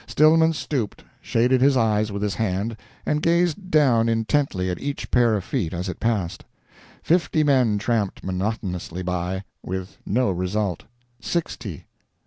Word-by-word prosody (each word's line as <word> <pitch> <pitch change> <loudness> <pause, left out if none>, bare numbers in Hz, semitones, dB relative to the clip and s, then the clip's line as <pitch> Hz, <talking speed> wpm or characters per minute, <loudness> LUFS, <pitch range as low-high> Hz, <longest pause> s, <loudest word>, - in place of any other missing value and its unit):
Stillman 160 +2 +5
stooped, 135 -7 -3 0.2
shaded 125 +2 +2
his 135 0 +5
eyes 110 -2 +2
with 100 0 -3
his 105 -2 0
hand, 110 +2 -1 0.3
and 150 0 0
gazed 175 +3 +1
down 125 -8 +4
intently 115 -3 0
at 90 - -5
each 145 0 -4
pair 120 -3 +4
of 100 - -2
feet 95 - -2
as 90 +3 -3
it 90 - -5
passed. 105 -7 -1 0.6
Fifty 165 -2 +2
men 130 -7 +3
tramped 105 -2 -1
monotonously 95 -2 -3
by 90 +1 -2 0.2
with 95 +1 -6
no 120 +1 +1
result. 90 0 -2 0.3
Sixty. 115 - -4
110 Hz, 140 wpm, -23 LUFS, 95-140 Hz, 0.6 s, Stillman